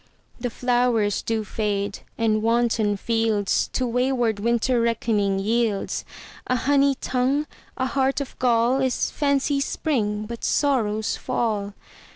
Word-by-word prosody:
The 245 +1 -2
flowers 240 -4 +1
do 225 -1 -1
fade, 205 -2 -2 0.2
and 220 -2 +1
wanton 225 -2 +1
fieldsTo 225 +3 0
wayward 245 -3 +1
Winter 235 +2 +1
reckoning 220 -4 +1
yields:A 220 +3 -2
honey 275 +2 +3
tongue, 260 +4 0 0.3
a 260 - 0
heart 265 +1 +1
of 280 - -5
gall, 245 +1 +3
Is 260 -2 0
fancy's 280 0 +1
spring, 215 -8 -1
but 235 +1 -8
sorrow's 220 -7 +1
fall. 205 -3 -2
235 Hz, 115 wpm, -24 LUFS, 215-255 Hz, 0.3 s, honey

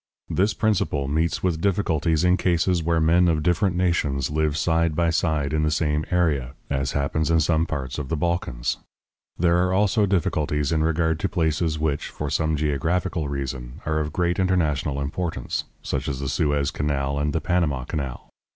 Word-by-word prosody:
This 100 +3 +1
principle 90 -10 0
meets 80 +4 0
with 85 -3 0
difficulties 85 -5 +1
in 90 0 +4
cases 90 -1 +1
where 85 0 +1
men 85 +3 +4
of 80 -2 +1
different 90 +2 +2
nations 75 -7 0
live 75 -1 0
side 80 0 +1
by 85 0 +2
side 75 -3 0
in 75 - +1
the 75 - +2
same 75 0 0
area, 75 -7 0 0.2
as 70 -1 -1
happens 70 +3 0
in 80 0 +4
some 80 +1 +2
parts 70 -3 -4
of 70 -3 -5
the 80 - -1
Balkans. 80 -7 -1 0.6
There 85 0 +3
are 90 +1 +2
also 105 +2 +3
difficulties 75 -5 0
in 80 -1 +2
regard 80 0 +1
to 95 - -1
places 80 -2 0
which, 75 -2 -1
for 75 -1 -5
some 80 +1 +1
geographical 75 +3 -1
reason, 65 -3 -4
are 80 0 0
of 75 0 -2
great 90 +2 0
international 75 -7 +1
importance, 70 -1 -3 0.2
such 70 +2 -2
as 70 -3 -2
the 70 -1 -3
Suez 75 -1 +1
Canal 70 -1 -1
and 75 +1 0
the 80 - 0
Panama 80 -7 0
Canal. 65 -1 -5
80 Hz, 180 wpm, -24 LUFS, 70-85 Hz, 0.6 s, in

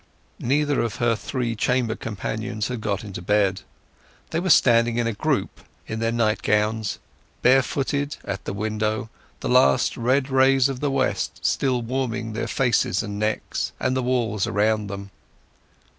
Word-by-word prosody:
Neither 145 +3 +1
of 115 -3 -2
her 120 -3 +1
three 120 +1 -3
chamber 120 0 +1
companions 110 0 -4
had 125 -3 -4
got 100 -2 -2
into 100 -4 -7
bed. 100 0 +1 0.7
They 165 - 0
were 185 +2 -2
standing 115 -5 +5
in 120 - +1
a 115 - 0
group, - - -1 0.3
in 110 - -4
their 115 0 0
nightgowns, 110 -1 +1 0.5
barefooted, 135 +3 +2
at 95 - -5
the - - -3
window, 110 +1 -2 0.3
the - - -2
last 70 0 +4
red 130 +3 +1
rays 135 0 +4
of 135 -2 -4
the 145 - 0
west 135 -1 -1
still 125 -3 +1
warming 120 -2 -2
their 110 - -3
faces 120 -6 +1
and 105 -1 -5
necks 110 0 -2
and 130 0 0
the 130 - +1
walls 120 -5 0
around 105 0 +1
them. 100 0 -7
115 Hz, 155 wpm, -23 LUFS, 105-130 Hz, 0.7 s, standing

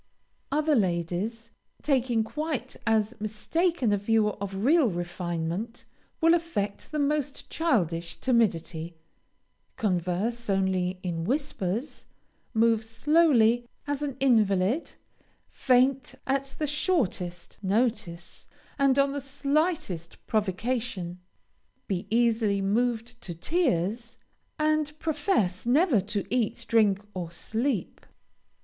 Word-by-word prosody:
Other 305 +2 +2
ladies, 195 - -1 0.3
taking 250 -5 +2
quite 285 0 -3
as 220 0 +2
mistaken 245 - 0
a - - +3
view 215 +1 +2
of 195 -1 -5
real 305 -1 +5
refinement, 175 +4 -4 0.4
will 330 +1 +6
affect 320 -13 -2
the 305 - -2
most 290 -1 -1
childish 175 - 0
timidity, 175 -9 0 0.8
converse 205 +4 -1
only 190 -1 +1
in 170 -3 -2
whispers, 240 - -2 0.5
move 225 0 +3
slowly 240 -1 +3 0.2
as 290 -1 -2
an 280 -3 -3
invalid, 220 - +2 0.5
faint 260 0 +2
at 270 0 -1
the 305 - -1
shortest 240 - -1
notice, 195 -4 -1 0.3
and 275 -1 +4
on 275 0 +4
the 285 0 -3
slightest 280 - -1
provocation; 205 -3 -2 0.7
be 185 -3 -3
easily 225 -3 +2
moved 235 +4 -1
to 175 - -6
tears, 230 - -1 0.4
and 305 -1 +1
profess 285 - 0
never 280 - +4
to 200 0 -3
eat, 240 -4 0
drink, 210 -3 +3
or 175 -3 -4
sleep. 225 +5 -2
230 Hz, 105 wpm, -27 LUFS, 190-275 Hz, 0.8 s, will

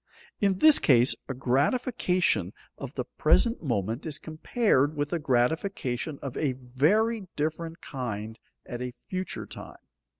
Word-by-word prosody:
In 195 -2 +2
this 310 +7 +7
case, 125 -3 +4 0.2
a 135 - -3
gratification 140 - +1 0.2
of 135 -1 -8
the 125 - -2
present 230 - +2
moment 115 - -2
is 150 - -3
compared 155 - +1
with 145 +2 -2
a 170 - 0
gratification 140 +1 0
of 135 -3 -5
a 140 -4 0
very 180 - +1
different 160 +2 -3
kind 110 -5 -5 0.3
at 120 0 -6
a 125 -1 -4
future 185 +7 -5
time. - - -10
145 Hz, 135 wpm, -27 LUFS, 125-180 Hz, 0.3 s, this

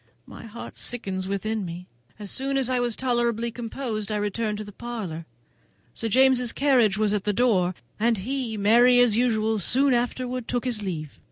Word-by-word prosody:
My - - -11
heart 230 +2 -9
sickens 190 -6 -3
within 210 +2 -2
me. 175 0 -7 0.3
As 205 -2 -5
soon 275 +1 -1
as 260 -2 +1
I 250 - +1
was 240 -2 0
tolerably 235 -2 0
composed 230 -2 -4
I - - 0
returned 210 +1 -2
to 215 - -5
the 205 - -10
parlour. 200 -8 -6 0.7
Sir 225 - -3
James's 255 0 +4
carriage 250 -8 +3
was 215 -1 +1
at 205 -2 -1
the 210 - 0
door, 190 -6 +2 0.2
and 230 +1 +2
he, 240 +2 -3
merry 240 +5 +5
as 245 -4 +5
usual, 220 -2 +1
soon 265 +8 +3
afterwards 245 0 -2
took 245 0 -2
his 235 -4 0
leave. 160 -7 -5
225 Hz, 180 wpm, -25 LUFS, 205-245 Hz, 0.7 s, merry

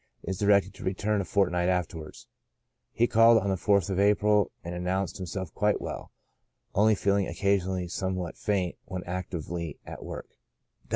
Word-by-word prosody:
Is 95 0 -4
directed 100 -1 +3
to 95 - -11
return 100 +2 0
a - - -4
fortnight 90 -4 +1
afterwards. 85 -3 -3 0.7
He 120 - +2
called 115 0 +6
on 100 -2 0
the - - +1
4th 100 +1 +2
of 95 - 0
April, 105 0 +3
and 85 0 -5
announced 90 0 -2
himself 95 -1 -5
quite 105 0 +1
well, - - -6 0.6
only 110 +2 +4
feeling 100 0 +1
occasionally 95 -2 0
somewhat 95 -1 -3
faint 95 -5 -1
when 95 -1 -5
actively 85 -3 -4
at - - -8
work. - - -7
95 Hz, 155 wpm, -28 LUFS, 90-100 Hz, 0.7 s, called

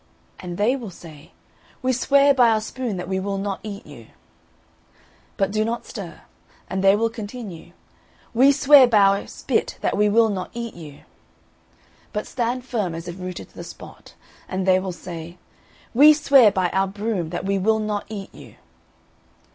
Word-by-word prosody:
And 175 -1 -7
they 225 +6 +2
will 240 -6 -7
say, 160 -4 -14 0.5
We 260 0 +2
swear 280 +3 +4
by 245 -3 +5
our 220 -1 +2
spoon 230 -2 -4
that 180 0 -5
we 190 0 -1
will 195 +1 -3
not 195 0 -3
eat 205 -2 -8
you!' 120 -7 -13 1.3
But 195 0 0
do 215 +1 +1
not 230 +2 -3
stir; 175 -7 -9 0.5
and 190 0 -3
they 195 +1 +6
will 225 +2 0
continue, 205 -6 -8 0.6
We 260 +4 +6
swear 280 -1 +7
by 230 -3 +3
our 200 0 +3
spit - - -2
that - - 0
we 210 +1 +3
will 225 +1 +4
not 185 -3 -4
eat 235 -1 -5
you!' 155 -4 -12 1.1
But 210 - -3
stand 245 +1 -3
firm, 210 -10 -2
as 165 +1 -7
if 175 +2 -7
rooted 180 -1 -7
to - - -28
the - - -8
spot; - - -13 0.3
and 185 0 -2
they 185 -1 +4
will 190 0 -4
say, 170 -1 -9 0.6
We 295 +5 +8
swear 275 -7 +5
by 185 -3 0
our 195 0 +1
broom 200 -3 -3
that 175 +2 -5
we 195 0 0
will 220 +3 +2
not 210 -1 -3
eat 200 -3 -7
you!' - - -14
205 Hz, 180 wpm, -22 LUFS, 185-230 Hz, 1.3 s, We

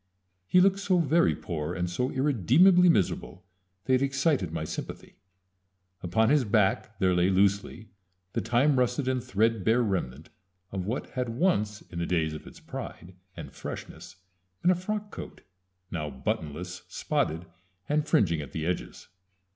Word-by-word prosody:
He 180 - +5
looked 195 +1 +4
so 195 -2 +2
very 165 +1 +3
poor 80 -1 -4
and 90 0 -1
so 90 +9 -1
irremediably 150 - +4
miserable 95 - 0 0.4
that 130 0 +3
he - - +3
excited 135 - 0
my 80 -1 -3
sympathy. 80 - -7 0.8
Upon 110 +6 +2
his 150 -2 +4
back 105 -1 +1
there 95 -3 +2
lay 90 +1 +3
loosely 100 +2 +1 0.4
the - - 0
time 125 +5 +2
rusted 125 +2 0
and 130 -2 0
threadbare 115 0 +2
remnant 80 - -3 0.4
of 95 -1 -4
what 120 +5 -3
had 125 -2 -2
once 110 - 0
in 85 - -8
the 85 - -2
days 80 -3 0
of 75 - -9
its - - -12
pride 90 - -8 0.2
and - - -8
freshness 85 +4 -8 0.5
been 180 - +5
a - - +3
frock 210 +3 -4
coat, - - -9 0.5
now 75 -4 -3
buttonless, 90 +4 -4
spotted, 80 +3 -1 0.4
and 150 +1 0
fringing 85 -7 +2
at 70 - -9
the 80 -1 -3
edges. 90 +1 -4
105 Hz, 155 wpm, -28 LUFS, 90-135 Hz, 0.8 s, He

